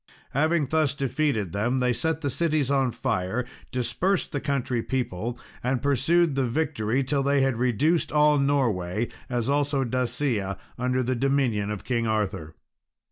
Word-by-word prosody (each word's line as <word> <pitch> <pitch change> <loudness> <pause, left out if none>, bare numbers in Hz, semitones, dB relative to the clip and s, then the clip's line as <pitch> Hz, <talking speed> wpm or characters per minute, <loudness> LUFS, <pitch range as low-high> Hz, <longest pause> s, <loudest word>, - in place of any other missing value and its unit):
Having 155 0 +1
thus 155 -3 +2
defeated 135 - 0
them, 110 +6 0
they 125 -1 +2
set 160 +7 -1
the 140 -3 -1
cities 155 -4 +1
on 135 -2 +2
fire, 115 -1 -1 0.3
dispersed 130 - 0
the 145 - -2
country 135 -4 -1
people, 120 -2 -3 0.3
and 125 +1 +1
pursued 145 +5 +2
the 135 -2 +1
victory 130 -3 0
till 140 +2 0
they 140 0 +2
had 135 -3 +1
reduced 125 +8 +1
all 150 -1 +4
Norway, 115 -7 +1 0.2
as 120 -2 -1
also 140 -1 +1
Dacia, 120 -5 -1 0.2
under 125 +1 0
the 130 +1 0
dominion 125 -6 +1
of 105 -2 -4
King 115 -2 0
Arthur. 95 -7 -2
130 Hz, 150 wpm, -26 LUFS, 115-145 Hz, 0.3 s, all